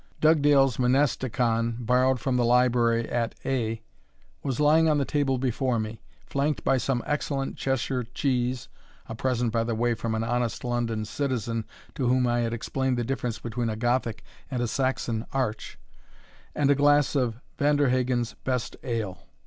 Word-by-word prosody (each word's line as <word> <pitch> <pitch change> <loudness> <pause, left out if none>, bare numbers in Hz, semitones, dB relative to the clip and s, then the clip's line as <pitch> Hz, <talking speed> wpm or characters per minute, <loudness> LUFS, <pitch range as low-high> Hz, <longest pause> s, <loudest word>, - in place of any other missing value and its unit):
Dugdale's 145 -5 +4
Monasticon, 125 -3 +1
borrowed 125 +2 +2
from 130 +2 -1
the 125 - +2
library 120 -1 +3
at 120 -1 -2
A, 115 -4 -1 0.6
was 135 -1 -3
lying 155 +2 +5
on 150 - +3
the 140 - +1
table 140 -2 0
before 125 -1 0
me, 110 +1 -5 0.2
flanked 140 +1 -1
by 135 - +3
some 125 -1 -1
excellent 140 -2 -2
Cheshire 135 -1 -1
cheese, 125 0 -1 0.4
(a - - -6
present, 120 0 0
by 115 0 +1
the 115 0 -2
way, 120 +1 +1
from 110 0 -3
an 110 - -1
honest 120 -1 -1
London 120 -3 -1
citizen, 115 -3 -2 0.3
to 130 - -1
whom 125 +1 +3
I 120 0 +1
had 115 -1 0
explained 130 +2 -1
the 120 - 0
difference 125 -2 -2
between 120 0 -3
a 110 - -2
Gothic 120 0 -1 0.3
and 130 -2 -2
a - - 0
Saxon 120 -2 -1
arch,) 125 -5 -2 0.8
and 145 -1 +3
a - - +7
glass 145 0 +3
of 125 -4 0 0.2
Vanderhagen's 130 -4 +2
best 125 -2 -2
ale. 110 -7 -4
125 Hz, 160 wpm, -26 LUFS, 115-135 Hz, 0.8 s, a